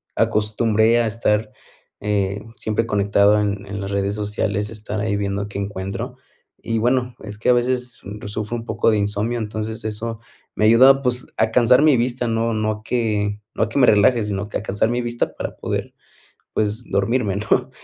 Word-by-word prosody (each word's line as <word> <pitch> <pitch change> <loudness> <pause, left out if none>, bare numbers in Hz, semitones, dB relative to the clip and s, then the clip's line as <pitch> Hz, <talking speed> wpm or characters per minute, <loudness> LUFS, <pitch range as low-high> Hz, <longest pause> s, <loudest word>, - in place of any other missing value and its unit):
acostumbré 110 +2 +2
a 115 - +1
estar, 105 -1 0 0.5
eh, 100 -1 -1 0.2
siempre 110 +1 -1
conectado 100 0 +3
en 100 -1 -2
en 100 0 -5
las 100 - -4
redes 100 +1 0
sociales, 105 0 -2
estar 105 -1 -5
ahí 105 -1 0
viendo 100 0 -2
qué 100 -1 -6
encuentro 100 +5 -5 0.5
y 115 -1 -1
bueno, 125 +1 +1
es 105 -1 -8
que 120 - 0
a - - +7
veces 125 0 -1 0.3
sufro 105 +2 -3
un 115 0 -5
poco 115 - +1
de 110 - +2
insomnio. 105 +4 -1
Entonces 110 0 -4
eso 110 +1 -4 0.4
me 110 - +2
ayuda 130 +5 +7
pues 125 -1 -1
a 110 0 +2
cansar 125 +3 +5
mi 150 -4 +5
vista. 120 0 -1
No 115 0 0
no 110 0 0
a 105 0 -7
que 105 -3 -1
no - - +2
a 105 - -1
que 125 - -1
me 125 - +6
relaje, 110 +3 +5
sino 105 -1 -3
que - - -2
a - - -7
cansar 105 +1 0
mi 120 +1 0
vista 120 0 -2
para - - -5
poder - - -3 0.6
pues 110 +3 -1
dormirme, 105 0 +1
¿no? 105 - +1
110 Hz, 190 wpm, -21 LUFS, 105-120 Hz, 0.6 s, a